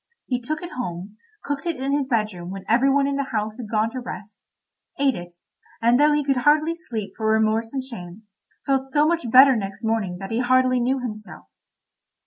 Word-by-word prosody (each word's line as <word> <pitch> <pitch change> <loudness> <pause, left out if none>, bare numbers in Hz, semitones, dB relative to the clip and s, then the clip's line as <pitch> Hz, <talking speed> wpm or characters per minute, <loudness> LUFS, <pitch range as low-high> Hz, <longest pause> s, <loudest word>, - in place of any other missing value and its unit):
He 250 -1 -2
took 310 +7 -4
it 350 - -7
home, 200 -3 -6 0.3
cooked 285 +3 -4
it 335 - 0
in 270 +2 -3
his 285 -2 -1
bedroom 210 -8 -2
when 195 0 -7
every 245 +5 +3
one 280 0 +3
in 280 0 -1
the 280 - 0
house 215 -4 -3
had 235 -4 -7
gone 220 +1 +1
to 255 - -5
rest, 210 -4 -9 0.5
ate 275 -1 +3
it, 175 -4 -9 0.4
and 235 +2 +3
though 300 +1 +5
he 295 0 +1
could 275 -2 +1
hardly 300 +5 +3
sleep 230 - -6
for 220 - -2
remorse 220 +1 +1
and 270 -1 -3
shame, 210 -5 -9 0.4
felt 270 -1 0
so 295 +2 +3
much 325 -6 0
better 265 +3 +8
next 200 +1 -5
morning 220 -5 -1
that 195 +2 -7
he 225 - 0
hardly 255 0 +3
knew 255 +3 +1
himself. 215 -4 -8
245 Hz, 205 wpm, -23 LUFS, 215-275 Hz, 0.5 s, better